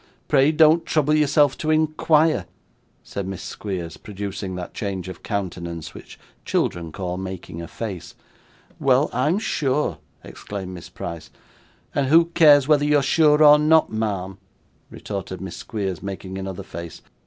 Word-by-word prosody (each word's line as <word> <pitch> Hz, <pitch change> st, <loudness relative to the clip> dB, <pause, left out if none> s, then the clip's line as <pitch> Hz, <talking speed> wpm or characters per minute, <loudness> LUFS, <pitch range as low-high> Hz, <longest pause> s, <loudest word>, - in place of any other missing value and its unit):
Pray 140 Hz, 0 st, +4 dB
don't 160 Hz, +1 st, +5 dB
trouble 155 Hz, -2 st, +1 dB
yourself 150 Hz, -2 st, +3 dB
to 155 Hz, -, -4 dB
inquire,' 155 Hz, -, +2 dB, 0.6 s
said 100 Hz, -2 st, -5 dB
Miss 95 Hz, -2 st, -6 dB
Squeers, 90 Hz, -6 st, -5 dB
producing 100 Hz, -2 st, -6 dB
that 90 Hz, -1 st, -7 dB
change 95 Hz, -3 st, -4 dB
of 95 Hz, -, -8 dB
countenance 85 Hz, -5 st, -5 dB
which -, -, -12 dB, 0.2 s
children 85 Hz, -2 st, -1 dB
call 90 Hz, +1 st, -4 dB
making 95 Hz, -3 st, -6 dB
a 85 Hz, -, -7 dB
face. 95 Hz, -2 st, -7 dB, 0.6 s
'Well, 135 Hz, +2 st, +3 dB
I'm 150 Hz, +9 st, +1 dB
sure!' 150 Hz, -8 st, -1 dB, 0.2 s
exclaimed 95 Hz, -2 st, -7 dB
Miss 85 Hz, -2 st, -10 dB
Price. 85 Hz, -2 st, -7 dB, 0.6 s
'And 140 Hz, -2 st, 0 dB
who 165 Hz, +4 st, +6 dB
cares 145 Hz, -4 st, +6 dB
whether 150 Hz, -2 st, +4 dB
you 150 Hz, 0 st, +3 dB
are 140 Hz, -, +1 dB
sure 150 Hz, +2 st, +4 dB
or 150 Hz, 0 st, +8 dB
not, 155 Hz, +1 st, +4 dB
ma'am?' 100 Hz, -3 st, -3 dB, 0.5 s
retorted 95 Hz, -2 st, -6 dB
Miss 95 Hz, -2 st, -7 dB
Squeers, 95 Hz, -6 st, -4 dB
making 95 Hz, -1 st, -6 dB
another 95 Hz, -1 st, -6 dB
face. 85 Hz, -2 st, -9 dB
105 Hz, 145 wpm, -22 LUFS, 95-150 Hz, 0.6 s, or